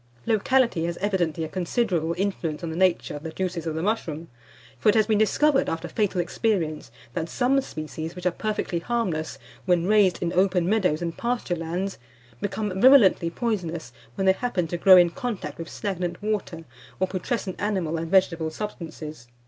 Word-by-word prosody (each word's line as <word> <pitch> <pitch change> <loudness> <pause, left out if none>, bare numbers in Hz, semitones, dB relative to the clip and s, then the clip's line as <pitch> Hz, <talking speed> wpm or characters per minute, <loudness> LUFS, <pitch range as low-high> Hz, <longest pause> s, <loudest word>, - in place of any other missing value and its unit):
Locality 230 -4 +2
has 170 0 -3
evidently 175 -6 0
a - - -2
considerable 175 -2 -1
influence 180 -5 -2
on 165 - -3
the - - -5
nature 185 -3 +1
of 145 - -7
the 160 - -5
juices 175 -1 -3
of 160 - -2
the 160 - -2
mushroom; 170 -7 -2 0.5
for 215 - +3
it 210 - +4
has 215 -1 +4
been 215 -1 +2
discovered, 275 +6 +3
after 165 - -3
fatal 205 -4 -1
experience, 175 - -1 0.2
that 165 +3 -3
some 265 +2 +2
species, 160 - -6
which 180 0 -9
are 180 - +3
perfectly 210 -3 -2
harmless 170 - -2 0.3
when 175 -2 +3
raised 205 -3 +4
in 175 0 -2
open 185 -1 +2
meadows 180 -6 +1
and 170 -1 -4
pasturelands, 190 -6 -2 0.4
become 195 -1 -2
virulently 235 -10 +6
poisonous 170 - -3 0.2
when 190 - -1
they 190 - +6
happen 195 -5 -1
to 165 - -4
grow 185 +2 +7
in 175 -1 +5
contact 190 -11 -5
with 165 - -6
stagnant 180 -4 -3
water 205 -6 -3 0.4
or 185 - +3
putrescent 190 +1 -3
animal 185 -6 -1
and 165 0 -4
vegetable 175 -4 +2
substances. 155 - -7
180 Hz, 175 wpm, -25 LUFS, 165-210 Hz, 0.5 s, grow